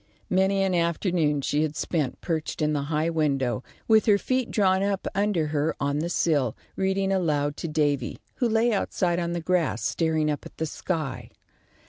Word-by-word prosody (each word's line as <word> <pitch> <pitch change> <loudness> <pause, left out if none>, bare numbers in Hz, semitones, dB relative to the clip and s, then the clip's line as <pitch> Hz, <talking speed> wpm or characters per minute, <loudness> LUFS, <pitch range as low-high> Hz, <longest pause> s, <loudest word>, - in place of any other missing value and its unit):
Many 190 +1 +3
an 190 -1 +1
afternoon 170 -3 +1
she 145 +2 0
had 155 -1 -1
spent, 150 -2 -2
perched 160 -3 -3
in 150 -1 +1
the 145 - 0
high 160 +1 +1
window, 135 -6 0 0.2
with 220 +1 +4
her 205 -2 +6
feet 255 +3 -1
drawn 190 -2 +2
up 200 -1 -1
under 200 -5 +1
her 150 +2 +1
on 140 +1 0
the 170 +2 -2
sill, 145 -9 +1 0.2
reading 190 0 0
aloud 150 -6 +1
to - - -4
Davy, 145 -5 0 0.2
who 245 - +1
lay 225 +1 +3
outside 180 -3 0
on 170 0 -2
the 175 - -1
grass, 175 -1 0
staring 160 -2 +1
up 145 - -4
at - - -12
the 160 - -1
sky. 155 -3 -4
165 Hz, 180 wpm, -26 LUFS, 150-190 Hz, 0.2 s, her